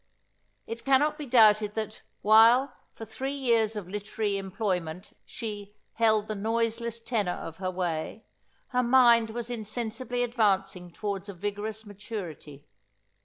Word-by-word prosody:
It 230 +1 -6
cannot 275 +3 +3
be 295 - -6
doubted 215 -3 +5
that, 215 -1 -4 0.2
while, 230 +5 +6 0.2
for 225 - -8
three 265 +5 -4
years 230 -5 +1
of 205 -4 -5
literary 205 +1 -3
employment, 185 -4 -3
she 205 -2 -6 0.2
"held 220 -2 +2
the 215 - -4
noiseless 230 +2 -1
tenor 220 -6 -1
of 165 0 -8
her 185 -1 -2
way," 180 +2 -3 0.4
her 250 - +1
mind 240 -2 +5
was 235 +1 -5
insensibly 240 +2 -3
advancing 195 -6 0
towards 200 +1 -4
a 200 - -7
vigorous 205 +3 -4
maturity. 185 -9 -8
215 Hz, 130 wpm, -28 LUFS, 200-235 Hz, 0.4 s, while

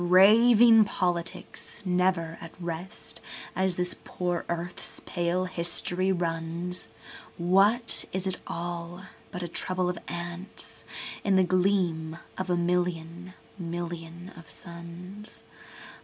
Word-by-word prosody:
Raving 220 +5 +8
politics, 175 +1 -2
never 180 -2 +2
at 165 +1 -10
rest—as 185 +1 -3
this 180 0 +1
poor 175 -1 -2
earth's 170 +1 -3
pale 175 +1 0
history 180 +1 +1
runs,—What 180 +5 +1
is 190 0 -2
it 190 -1 0
all 175 +1 -4 0.3
but 180 - -5
a - - -2
trouble 180 +2 0
of 180 - -3
ants 175 +3 -5 0.4
in 200 -2 +3
the 190 - +6
gleam 180 -3 +1 0.2
of 185 0 -3
a 175 - +3
million 175 0 -1 0.2
million 170 0 -5
of 165 -3 -13
suns? 175 +6 -8
180 Hz, 105 wpm, -28 LUFS, 170-185 Hz, 0.4 s, Raving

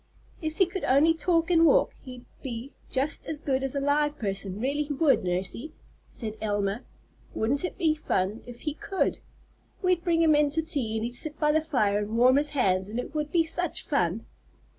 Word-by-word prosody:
"If 315 -1 -4
he 380 - +5
could 360 +1 -6
only 290 +5 +5
talk 330 +1 +1
and 330 -1 +5
walk, 315 - +4
he'd 250 -2 -10 0.2
be 245 +1 -6 0.2
just 275 +4 -2
as 310 -2 -3
good 270 -2 0
as 270 0 -2
a - - +1
live 295 +1 +1
person, 195 -2 -2
really 280 +5 0
he 295 0 -2
would, 285 -4 +3
Nursey," 185 - -2 0.4
said 220 -2 -6
Elma. 205 +1 -1 0.5
"Wouldn't 265 +8 0
it 360 - -4
be 325 -4 +3
fun 210 -8 -1
if 240 -1 -10
he 300 - -2
could! 385 +5 -1 0.6
We'd 365 -2 +2
bring 335 -1 +2
him 315 -1 +5
in 295 0 +4
to 320 +3 -1
tea 270 -9 -3
and 220 0 -1
he'd 240 - -4
sit 300 +5 -3
by 300 -1 +3
the 315 +1 +3
fire 215 -10 +1
and 210 +2 -3
warm 255 +3 +6
his 295 +1 +2
hands, 190 -10 +1
and 215 +3 -5
it 250 - -6
would 300 -1 -2
be 335 -2 +4
such 330 +1 -3
fun." 185 - 0
280 Hz, 205 wpm, -27 LUFS, 225-315 Hz, 0.6 s, warm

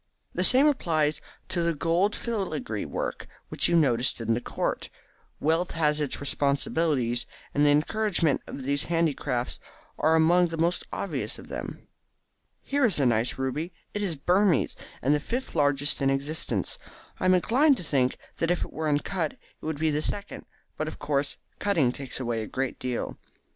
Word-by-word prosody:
The 180 - 0
same 255 +8 +6
applies 160 - +2 0.3
to 180 -2 0
the 170 -1 +1
gold 170 +7 +2
filigree 155 - -3
work - - -4 0.2
which - - +2
you 175 - +2
noticed 130 -7 +3
in 115 0 +1
the 120 - -1
court. - - -2 0.5
Wealth 165 +4 +1
has 150 -2 +2
its 145 - -2
responsibilities, 140 -2 +1 0.3
and 145 - +3
the 145 - +6
encouragement 165 +1 +2
of 135 - -7
these 140 +2 0
handicrafts 155 -7 0 0.4
are 160 +1 +4
among 175 +2 +5
the 165 -1 -5
most 170 +2 0
obvious - - -3
of - - -12
them. - - -6 0.8
Here 285 0 0
is 220 -8 +3
a 140 - +3
nice 115 0 +1
ruby. 145 +7 -2 0.2
It 205 - -2
is 185 -6 0
Burmese, 180 +2 +2 0.3
and 140 +4 +4
the 150 - +3
fifth 245 - -4
largest 145 -1 +3
in 135 - +3
existence. 140 +4 -1 0.4
I - - -1
am 185 0 +6
inclined 265 - +4
to - - -5
think 130 -5 +1 0.2
that 165 - 0
if 175 -1 +1
it - - -13
were 155 0 -1
uncut 155 +2 0
it - - -23 0.2
would 155 -1 -3
be 155 +1 +1
the 150 +1 0
second, 200 +5 -5 0.3
but 155 - -2
of 155 - -6
course 145 -1 -1 0.2
cutting 165 -12 +2
takes 135 0 -5
away 120 -3 -1
a 110 - -5
great 130 -1 -3
deal." 125 -2 -3
155 Hz, 175 wpm, -27 LUFS, 140-175 Hz, 0.8 s, same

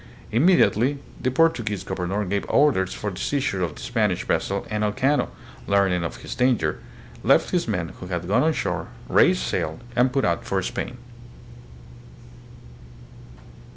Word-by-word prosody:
Immediately 140 - +3 0.2
the 130 - +1
Portuguese 120 - +1
governor 95 +2 -2
gave 100 +2 -1
orders 130 -11 +3
for 105 - -4
the 90 - -8
seizure 130 -6 -1
of 80 -4 -2
the - - -11
Spanish 105 -7 0
vessel 100 0 -1
and 105 0 0
Elcano, 130 +8 +1 0.4
learning 95 -3 +2
of 85 - -6
his - - -5
danger, 125 -12 +1 0.4
left - - +3
his - - 0
men - - -2
who 90 - -7
had 90 -1 -3
gone 105 +7 +3
on 160 - +3
shore, - - -2 0.2
raised - - +4
sail, 80 +1 -2 0.2
and 125 +1 +3
put 135 +1 +1
out 85 0 0
for 95 -1 -1
Spain. 125 - -4
105 Hz, 150 wpm, -24 LUFS, 95-130 Hz, 0.4 s, raised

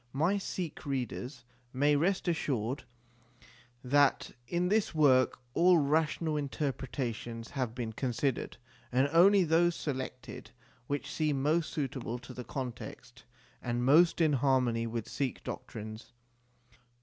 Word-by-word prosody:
My 170 +9 +2
Sikh 180 -4 -5
readers 130 -1 -4 0.3
may 145 +3 +3
rest 180 +6 +1
assured 135 -6 -1 1.0
that 140 +2 +3 0.2
in 175 +6 0
this 210 -4 +1
work 130 -5 +4 0.2
all 180 +1 +5
rational 155 +1 +1
inter 145 0 -1
pretations 120 -3 -5
have 125 -4 -3
been 115 -3 -4
considered, 130 +2 -2 0.3
and 130 +3 +3
only 190 +4 +6
those 170 +1 +3
selected 130 -3 -5 0.4
which 145 0 -3
seemed 150 -4 0
most 155 +2 +1
suitable 130 -5 -3
to 125 +1 -11
the 125 - -7
context 125 -1 -7 0.4
and 120 0 -1
most 165 +7 +5
in 155 -2 +4
harmony 125 -4 +2
with 115 -1 -4
Sikh 135 -4 -3
doctrines. 110 +2 -7
135 Hz, 125 wpm, -31 LUFS, 125-155 Hz, 1.0 s, only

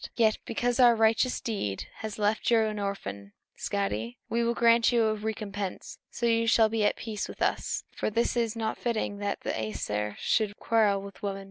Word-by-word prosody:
Yet 220 -2 +3
because 245 +2 -1
our 240 -2 +7
righteous 225 +3 +2
deed 105 - -3
has 215 -2 -6
left 210 +1 +1
you 230 -1 +5
an 215 -1 -1
orphan, 100 - -5 0.2
Skadi, 105 +4 -2
we 235 +1 +1
will 235 0 +1
grant 235 0 +5
you 235 -1 +3
a 215 - +2
recompense, 205 -2 -5
so 235 - -3
you 230 0 +2
shall 225 -1 +5
be 220 -1 0
at 205 - +3
peace 215 -2 -4
with - - -10
us; - - -1
for - - -2
it 215 - -4
is 235 -1 +1
not 220 -1 -2
fitting 220 -4 -1
that 205 0 -2
the - - -2
Æsir 105 -1 -3
should 210 -2 0
quarrel 210 -4 +2
with 200 0 -11
women. 195 -1 -3
215 Hz, 195 wpm, -28 LUFS, 200-230 Hz, 0.2 s, our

